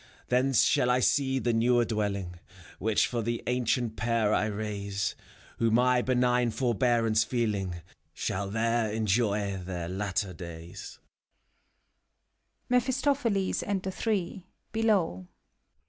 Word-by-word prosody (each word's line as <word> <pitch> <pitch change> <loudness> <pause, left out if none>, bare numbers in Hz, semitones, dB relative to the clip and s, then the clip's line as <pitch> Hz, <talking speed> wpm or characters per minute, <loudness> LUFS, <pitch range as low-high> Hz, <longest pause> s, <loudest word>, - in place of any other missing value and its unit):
Thence 125 -2 +3
shall 125 +2 +3
I 125 0 +3
see 135 +1 +2
the 120 -2 0
newer 120 +1 +3
dwelling 100 -5 -2 0.4
Which 110 +1 +2
for 120 -2 -2
the 115 +1 -2
ancient 125 -2 0
pair 115 -2 +1
I - - +2
raise. 100 -1 -3 0.5
Who, 115 - +3
my 125 +2 +3
benign 125 -1 +2
forbearance 115 -2 +2
feeling, 100 -7 -2 0.3
Shall 100 +1 -3
there 115 +1 0
enjoy 105 -2 0
their 90 -2 -4
latter 95 0 -2
days. 85 0 -9
110 Hz, 95 wpm, -28 LUFS, 100-120 Hz, 0.5 s, Thence